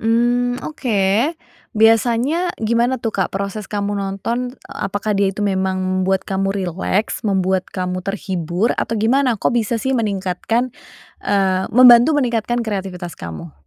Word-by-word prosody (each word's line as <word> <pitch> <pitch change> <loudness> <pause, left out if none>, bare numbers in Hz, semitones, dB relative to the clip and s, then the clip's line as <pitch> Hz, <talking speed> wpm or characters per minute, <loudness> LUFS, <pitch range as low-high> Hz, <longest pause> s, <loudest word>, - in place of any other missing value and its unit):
Mmm, 245 +2 +1
oke. 230 - 0 0.4
Biasanya 235 +9 +2
gimana 235 +3 +1
tuh 225 -2 -2
Kak 190 - -1
proses 200 +2 -4
kamu 205 0 -2
nonton? 200 +6 -3 0.2
Apakah 205 +2 -3
dia 195 -1 +2
itu 210 - -7
memang 190 -1 0 0.2
membuat 190 0 0
kamu 195 0 0
rileks? 190 +3 -2
Membuat 190 -2 +1
kamu 185 -1 -3
terhibur? 190 +1 -1
Atau 230 - -1
gimana? 250 +2 +2
Kok - - +1
bisa 230 0 0
sih 265 - -1
meningkatkan 210 +3 -1 0.6
eee, 190 -2 +1
membantu 245 +3 +8
meningkatkan 240 -3 0
kreativitas 190 -6 -4
kamu? 80 -1 -8
205 Hz, 130 wpm, -19 LUFS, 190-235 Hz, 0.6 s, membantu